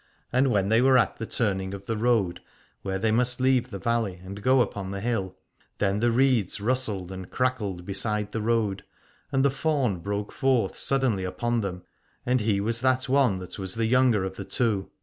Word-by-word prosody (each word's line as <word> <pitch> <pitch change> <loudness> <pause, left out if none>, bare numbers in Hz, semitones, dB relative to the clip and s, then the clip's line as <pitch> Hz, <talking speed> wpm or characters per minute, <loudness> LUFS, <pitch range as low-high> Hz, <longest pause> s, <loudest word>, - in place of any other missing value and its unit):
And 130 +2 +3
when 100 -4 +1
they 110 +2 +4
were 130 0 +5
at - - +1
the 115 - -5
turning 95 -4 -1
of 100 0 -11
the 115 - -2
road, 110 -6 +1 0.4
where 95 -1 -2
they 110 +3 +1
must 125 +2 +1
leave 130 -1 +2
the 100 - -6
valley 115 -3 -1
and 100 +2 -8
go 130 +4 +4
upon 100 -4 -3
the 100 0 -4
hill, 100 -4 -1 0.5
then 100 0 +1
the 120 +2 +2
reeds 125 -6 +2
rustled 105 -5 -1
and 95 -1 -7
crackled 105 -9 -2
beside 105 +2 -2
the 115 - -3
road: 110 -3 0 0.5
and 135 -1 +2
the 140 - +4
faun 135 - 0
broke 100 +3 -3
forth 125 -7 +1
suddenly 130 -8 +1
upon 120 +5 -1
them, 90 -3 -5 0.4
and 125 0 +2
he 105 -2 +1
was 115 +3 -1
that 130 0 +2
one 130 -6 +3
that 90 +2 -8
was 95 -1 -1
the 115 0 0
younger 120 -3 +3
of 95 0 -5
the 100 - -5
two. 105 -5 0
110 Hz, 200 wpm, -26 LUFS, 100-125 Hz, 0.5 s, were